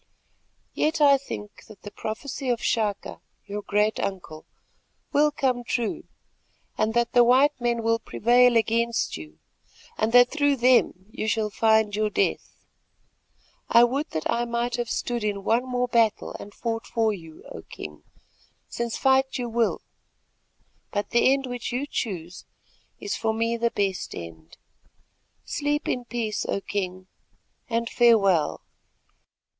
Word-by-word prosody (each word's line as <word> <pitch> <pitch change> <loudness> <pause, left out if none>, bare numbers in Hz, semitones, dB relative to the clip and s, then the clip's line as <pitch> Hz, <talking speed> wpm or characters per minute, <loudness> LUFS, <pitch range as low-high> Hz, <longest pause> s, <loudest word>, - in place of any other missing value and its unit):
Yet 315 +2 0
I 280 -2 +6
think 210 -6 -9
that 210 - -15
the 205 - -8
prophecy 255 +6 -5
of 240 -2 +1
Chaka, 215 -5 -2 0.2
your 205 0 -5
great 210 +1 0
uncle, 175 -5 -5 0.7
will 300 +1 +4
come 260 -4 -1
true, 235 -2 -2 0.7
and 220 +1 0
that 235 -1 +2
the 245 -1 +7
white 260 +3 +4
men 235 -1 0
will 230 0 +2
prevail 245 +2 +3
against 230 +1 0
you 75 -1 -10 0.6
and 220 +1 +1
that 245 0 +7
through 285 -2 +2
them 245 -7 +3
you 215 - -4
shall 215 -1 0
find 220 -1 +2
your 215 0 0
death. - - -2 1.0
I 235 0 +7
would 275 +6 0
that 155 - -3
I 235 +1 0
might 235 +1 -2
have 240 -1 -3
stood 240 -2 -2
in 205 -2 -2
one 235 +5 +1
more 250 0 0
battle 230 -3 +1
and 205 - -10
fought 225 +1 -4
for 225 -2 +1
you, 165 -5 -11
O - - -8
King, 75 -1 -10 0.7
since 235 -1 -4
fight 265 0 +2
you 245 -1 -3
will, 230 -1 0 1.1
but 205 -1 -3
the 240 +2 +4
end 270 0 +1
which 245 -2 -5
you 250 +4 -2
choose 180 - -5 0.6
is - - -3
for 220 -1 -1
me 230 +1 0
the 235 0 +1
best 195 -4 -2
end. 85 -1 -10 0.9
Sleep 295 0 -2
in 250 -1 -2
peace, 230 -3 -3
O - - -1
King, 185 -2 -4 0.6
and 230 0 -1
farewell. 205 -10 +3
230 Hz, 145 wpm, -25 LUFS, 210-245 Hz, 1.1 s, the